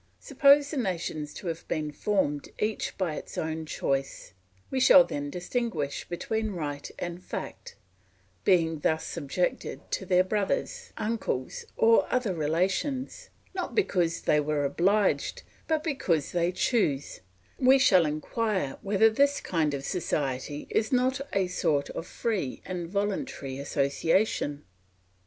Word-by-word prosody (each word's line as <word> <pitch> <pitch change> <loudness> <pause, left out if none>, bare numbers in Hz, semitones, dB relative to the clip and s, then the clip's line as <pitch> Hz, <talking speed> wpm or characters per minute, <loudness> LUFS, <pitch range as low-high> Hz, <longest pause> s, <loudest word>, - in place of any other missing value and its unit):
Suppose 285 0 +4
the 305 - -3
nations 170 - -2
to - - -9
have 165 -1 -4
been 155 -2 -2
formed 150 -5 -1
each 215 0 -2
by 180 -5 -1
its - - -8
own 160 0 -3
choice; 135 -6 -2 0.4
we 265 - 0
shall 265 +1 +8
then 145 - -4
distinguish 180 - -3
between 220 +4 -2
right 145 -4 -4
and 175 +1 -5
fact; - - -7 0.7
being 165 -4 +3
thus 160 +2 0
subjected 150 +6 -3
to 190 - -2
their 180 -1 +5
brothers, 210 - -2
uncles, 210 - -2
or 225 0 +4
other 250 -6 +1
relations, 185 - -1 0.2
not 370 -1 -4
because 175 - +1
they 150 - +3
were 150 -1 0
obliged, 195 +7 +1 0.2
but 315 -1 +1
because 190 - 0
they 175 0 +1
choose, 180 - 0 0.4
we 265 +1 +6
shall 185 - +5
inquire 180 - -2
whether 205 +2 +4
this 280 +5 +3
kind 155 -4 0
of 135 0 -5
society 145 -4 -2
is 220 - +1
not 260 +1 +2
a 195 -1 +2
sort 150 -5 0
of 165 - -6
free 205 - -2
and 175 -2 -4
voluntary 200 - -2
association? 145 +2 0
180 Hz, 135 wpm, -28 LUFS, 150-225 Hz, 0.7 s, shall